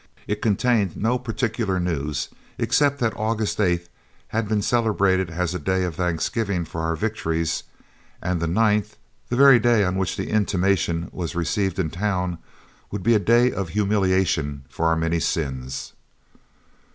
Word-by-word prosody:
It 105 0 -3
contained 110 -3 +1
no 120 +4 +1
particular 115 -5 -1
news 75 -5 -2 0.3
except 145 -1 +2
that 115 -4 0
August 110 -1 -1
8th 85 -4 +1 0.4
had 115 -1 -1
been 105 -1 0
celebrated 100 -6 +2
as 85 0 -2
a 90 - -3
day 95 0 0
of 90 -2 -2
thanksgiving 90 +3 -1
for 80 +1 -5
our 80 0 0
victories, 80 -5 -1 0.6
and 90 -1 -1
the 85 - -1
9th, 105 +3 +1 0.3
the 120 - 0
very 135 -1 +7
day 120 -3 +3
on 90 0 0
which 95 -1 -1
the - - -4
intimation 95 -5 +1
was 85 -3 -4
received 95 +2 0
in 80 -5 -1
town, 90 -2 -1 0.5
would 100 -2 -5
be 115 - +4
a 110 - +4
day 120 +5 +4
of 95 -4 -3
humiliation 95 -8 +1
for 85 - -1
our 80 - +3
many 80 +1 0
sins. 65 -6 -3
95 Hz, 155 wpm, -23 LUFS, 85-110 Hz, 0.6 s, very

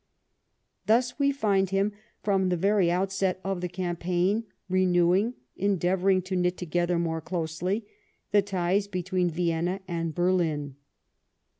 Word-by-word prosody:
Thus 245 +5 +2
we 280 0 +3
find 200 -8 +1
him, 195 +2 +1 0.3
from 195 -2 +2
the 180 - +1
very 195 0 +3
outset 190 +1 0
of 195 -2 -2
the 180 - -2
campaign, 180 +4 -1 0.2
renewing, 185 +4 +3 0.2
endeavouring 190 -1 +2
to 185 +1 -3
knit 180 0 +1
together 175 0 0
more 165 -1 -1
closely, 175 +5 -2 0.5
the 205 -1 +5
ties 195 0 0
between 185 -1 -1
Vienna 170 +2 -1
and 165 -3 -3
Berlin. 165 -6 0
185 Hz, 125 wpm, -27 LUFS, 175-195 Hz, 0.5 s, the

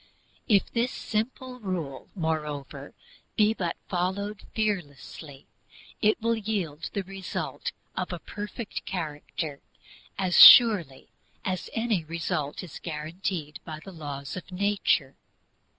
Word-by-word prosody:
If 205 -5 +3
this 240 +2 +1
simple 250 +3 -3
rule, 175 - -4
moreover, 150 -4 -3 0.4
be 215 0 +4
but 175 -6 -2
followed 195 +3 -2
fearlessly, 155 -8 -3 0.6
it 215 0 +3
will 230 +1 +1
yield 190 -9 -3
the 200 - -1
result 190 0 -4 0.2
of - - -2
a - - -3
perfect 210 +2 -6
character 155 -3 -4 0.6
as 185 -2 +4
surely 185 - +8 0.4
as 185 -1 -2
any 225 -6 0
result 165 -2 -2
that 180 - -9
is - - -8
guaranteed 155 0 -4
by 155 -1 -7
the 195 +5 -11
laws 145 -5 -6
of 185 - -8
nature. 195 -8 +1
180 Hz, 120 wpm, -27 LUFS, 150-210 Hz, 0.6 s, surely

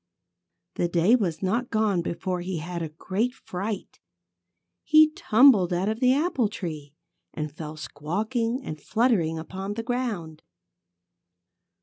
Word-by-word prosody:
The 175 - +1
day 175 +7 +4
was 185 -8 -1
not 235 +7 0
gone 215 -5 +1
before 180 +1 -3
he 180 0 -3
had 170 +2 -5
a 160 - -3
great 200 +10 -2
fright. 195 +2 -5 0.8
He 310 -1 +6
tumbled 220 - +5
out 180 +3 0
of 220 +1 -2
the 255 -1 +4
apple 275 - +1
tree 155 -8 -6 0.4
and 150 -1 -3
fell 155 0 -7
squawking 220 - -2
and 155 - -7
fluttering 215 -9 +1
upon 190 +5 -5
the 230 - -3
ground. 225 -11 -3
195 Hz, 130 wpm, -26 LUFS, 165-235 Hz, 0.8 s, He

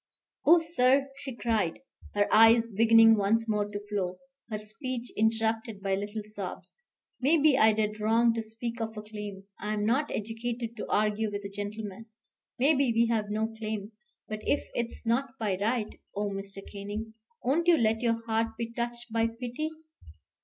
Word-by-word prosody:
"Oh, 340 +3 +8
sir," 275 -4 +2
she 275 -3 -7
cried, 220 -8 0 0.4
her 205 0 +3
eyes 225 +1 +6
beginning 225 +1 +7
once 220 +3 +2
more 210 -1 0
to 205 0 -4
flow, 185 -3 -2 0.3
her 215 - -2
speech 235 +3 -5
interrupted 220 -1 0
by 195 0 -1
little 205 +2 -3
sobs. 210 - -7 0.4
"Maybe 295 +1 +5
I 220 -4 +6
did 215 0 -1
wrong 230 +2 +3
to 225 - -2
speak 230 +2 -5
of 220 -1 -4
a 210 - -5
claim. 210 -2 -7 0.2
I'm 210 0 -1
not 270 +7 +2
educated 230 +2 -4
to - - -5
argue 210 0 +1
with 205 0 -4
a - - -4
gentleman. 205 +1 -6 0.5
Maybe 275 -1 +3
we 230 0 +3
have 210 -2 -1
no 215 +1 0
claim. 215 -1 -4 0.4
But 215 0 -4
if 285 - 0
it's 235 0 -3
not 235 +2 0
by 210 -4 0
right, 220 0 -1 0.2
oh, 205 0 -1
Mr. 195 0 -6
Canning, 205 +2 -6 0.3
won't 310 +7 +1
you 345 -2 +7
let 225 -2 +2
your 230 -1 0
heart 225 0 0
be 230 0 -4
touched 240 0 -4
by 230 0 +3
pity? 245 +6 -4
225 Hz, 165 wpm, -29 LUFS, 210-235 Hz, 0.5 s, Oh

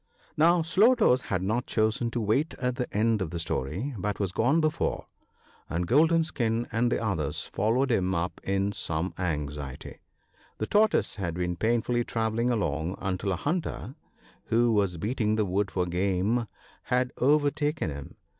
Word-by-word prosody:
Now 170 +2 +4
Slow 205 +10 +5
toes 130 - +3
had 90 -1 0
not 110 +5 -1
chosen 110 +2 +1
to 120 - -3
wait 120 +9 +1
the 125 0 -2
end 110 +1 +1
of 90 - -2
the 85 - -5
story, 85 - -2
but 105 +2 -2
was 100 -3 0
gone 130 - +2
before, 155 -1 0 0.6
and 85 +2 -1
Golden 160 - +4
skin 120 -6 -1
and 120 +1 +1
the - - +1
others 90 -10 -1
followed 120 +6 0
him 95 -4 +1
up 85 +1 -3
in 100 +1 0
some 85 -2 -3
anxiety. 75 -6 -4 0.6
The 110 - -2
Tortoise 215 - +2
had 85 -4 -3
been 90 0 -1
painfully 120 +4 +1
travelling 115 +1 -1
along, 90 -6 -1
until 95 +1 -2
a - - +1
hunter, 155 - -3 0.5
who 120 +1 +3
was 100 -5 +1
beating 110 +3 0
the 110 -1 +1
wood 100 +2 0
for 90 -2 -1
game, 95 +6 0 0.4
had 125 0 0
overtaken 145 - +1
him. 70 -1 -8
110 Hz, 160 wpm, -27 LUFS, 90-125 Hz, 0.6 s, Slow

